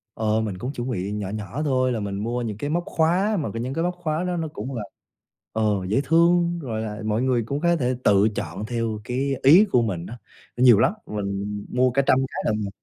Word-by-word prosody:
Ờ, 110 0 +1
mình 100 -4 -3
cũng 125 +8 -4
chuẩn 120 +1 -4
bị 100 -3 -2
nhỏ 105 -2 -3
nhỏ 110 +8 -4
thôi. 130 -3 +1
Là 115 - -1
mình 100 -1 -4
mua 120 +4 -2
những 110 -3 -4
cái 145 +5 -3
móc 170 +2 0
khóa 185 +6 +1
mà 145 -9 -2
những 120 +4 -3
cái 165 - -1
móc 180 0 -1
khóa 165 -1 -2
đó 180 -1 -2
nó 160 -1 -2
cũng 130 +6 -5
là, 110 - -3 0.7
ờ, 110 0 -1 0.2
dễ 110 +8 +1
thương, 170 +2 +3
rồi 110 -5 -3
là 105 -1 -5
mọi 110 +2 0
người 125 -3 +1
cũng 140 +4 -2
có 170 0 +3
thể 130 -5 0
tự 100 +1 +5
chọn 105 - -4
theo 115 -2 -2
cái 135 +3 -1
ý 170 +10 +8
của 125 - +4
mình 90 -6 -2
á, 120 - -8 0.4
nhiều 120 -4 +6
lắm. 185 - +3
Mình 100 0 -4
mua 125 0 +2
cả 140 +3 +2
trăm 130 - +5
cái - - -5
lận 105 -1 0
mà. - - -4
125 Hz, 240 wpm, -24 LUFS, 105-150 Hz, 0.7 s, ý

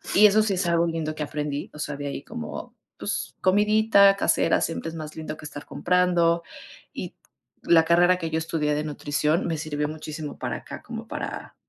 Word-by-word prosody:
y 210 - +8
eso 210 +1 +6
sí 210 -3 +1
es 185 0 -1
algo 170 0 +2
lindo 160 -2 -2
que 155 - -7
aprendí. 150 -1 -3
O - - -9
sea, 150 -1 -3
de 145 0 -5
ahí 140 0 -5
como, 240 +1 -7 0.2
pues, 200 -1 -4
comidita 205 0 +5
casera - - +2
siempre 165 0 -2
es 165 - -8
más 155 -1 -7
lindo 155 -1 -6
que 150 - -11
estar 145 0 -8
comprando. 175 -2 +2 0.5
Y - - -6 0.5
la 165 -1 +5
carrera 175 +2 +5
que 165 -2 -4
yo 160 - +1
estudié 160 -2 -1
de 150 - -1
nutrición 150 +2 0
me 165 -2 -1
sirvió 150 -1 -2
muchísimo 155 -1 -7
para - - -2
acá - - -9
como - - -8
para, - - -6
165 Hz, 195 wpm, -25 LUFS, 150-185 Hz, 0.5 s, y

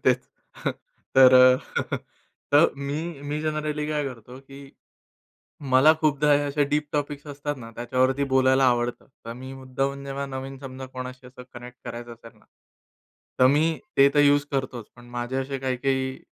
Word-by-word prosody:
तेच - - +4 1.0
तर 130 -1 +8 1.4
मी 140 +2 -3 0.2
मी 145 +1 -3
जनरली 150 -1 -2
काय 150 -1 -1
करतो, 125 -1 -8
की 140 0 -12 1.0
मला 135 +5 +7
खूपदा 150 -1 +3
हे 145 - +4
असे 145 0 0
डीप 150 0 +1
टॉपिक्स 145 0 -3
असतात 145 +1 -4
ना, 115 -2 -10
त्याच्यावरती 130 +3 +1
बोलायला 130 0 +4
आवडतं. 120 -1 0 0.2
तर 115 - -6
मी 130 +2 -9
मुद्दामून 135 +1 -3
जेव्हा 140 0 -4
नवीन 135 0 -7
समजा 130 -1 -8
कोणाशी 130 0 -8
असं 125 0 -12
कनेक्ट 120 0 -10
करायचं 120 0 -7
असेल 115 0 -15
ना, - - -26 0.9
तर 130 - +6
मी 155 +4 +2 0.2
ते 140 - +8
तर 145 - +5
यूज 145 0 +4
करतोच. 130 -4 -3
पण 120 0 -15
माझे 120 +1 -4
असे 135 +1 -3
काही-काही 130 0 -1
135 Hz, 150 wpm, -25 LUFS, 130-145 Hz, 1.4 s, तर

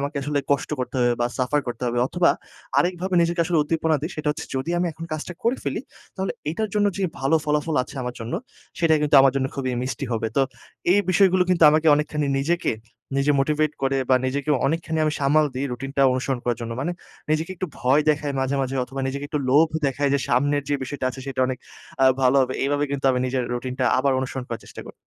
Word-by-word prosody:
আমাকে 140 +2 -3
আসলে 145 0 0
কষ্ট 140 - -1
করতে 125 - -4
হবে 120 0 +3
বা 120 - +3
সাফার 135 +3 +1
করতে 120 0 -5
হবে।" 120 0 -1
অথবা 175 +4 +3 0.5
আরেকভাবে 180 +1 0
নিজেকে 170 0 0
আসলে 165 -1 +1
উদ্দীপনা 160 0 +1
দিই 160 - -3
সেটা 150 -1 -2
হচ্ছে, 150 - -4
"যদি 130 +6 -2
আমি 175 - +1
এখন 165 +2 -8
কাজটা 155 +3 -4
করে 240 +3 +2
ফেলি - - -2 0.3
তাহলে 190 0 -2 0.2
এটার 215 +6 -2
জন্য 205 -1 +3
যে 200 - -2 0.2
ভালো 135 +4 +3
ফলাফল 150 +1 0
আছে 125 - -11
আমার 125 0 -4
জন্য 115 +7 -4 0.4
সেটা 165 -2 +4
কিন্তু 150 -1 +1
আমার 135 -1 +5
জন্য 130 -1 +1
খুবই 130 -2 -2
মিষ্টি 135 +2 -3
হবে।" 115 0 -1
তো 135 - +5 0.5
এই 205 - +5
বিষয়গুলো 185 -1 +4
কিন্তু 175 -2 +2
আমাকে 155 +1 +2
অনেকখানি 150 0 -1
নিজেকে 170 +6 0 0.4
নিজে 140 +2 +3
মোটিভেট 150 +1 +1
করে 135 0 +1
বা 130 - +7
নিজেকে 140 +3 -2 0.2
অনেকখানি 160 +2 -1
আমি 155 - +1
সামাল 145 +2 +4
দিই, 135 +2 -2
রুটিনটা 135 +2 -2
অনুসরণ 130 0 -1
করার 120 -2 0
জন্য, 115 0 -4
মানে 175 +5 -1 0.4
নিজেকে 160 +3 0
একটু 185 - -3
ভয় 130 +4 +3
দেখাই 145 -1 -1
মাঝে, 135 +1 0
মাঝে 135 +1 -3
অথবা 135 +2 -6
নিজেকে 140 +2 -4
একটু 150 - -1
লোভ 155 +4 +5 0.2
দেখাই 140 +1 0
যে 140 - +3
সামনের 145 +3 +2
যে 145 - +1
বিষয়টা 130 0 -3
আছে 130 - -9
সেটা 135 -1 -3
অনেক 130 0 -3 0.4
আ - - +7 0.2
ভালো 130 +2 +4
হবে। 130 0 -2
এভাবে 145 +1 +1
কিন্তু 140 -1 -3
আমি 125 - 0
নিজের 130 0 -1
রুটিনটা 125 +1 -2
আবার 135 +1 +2
অনুসরণ 130 0 -4
করার 115 -2 -5
চেষ্টা - - -10
করি। - - -10
140 Hz, 220 wpm, -23 LUFS, 130-160 Hz, 0.5 s, বা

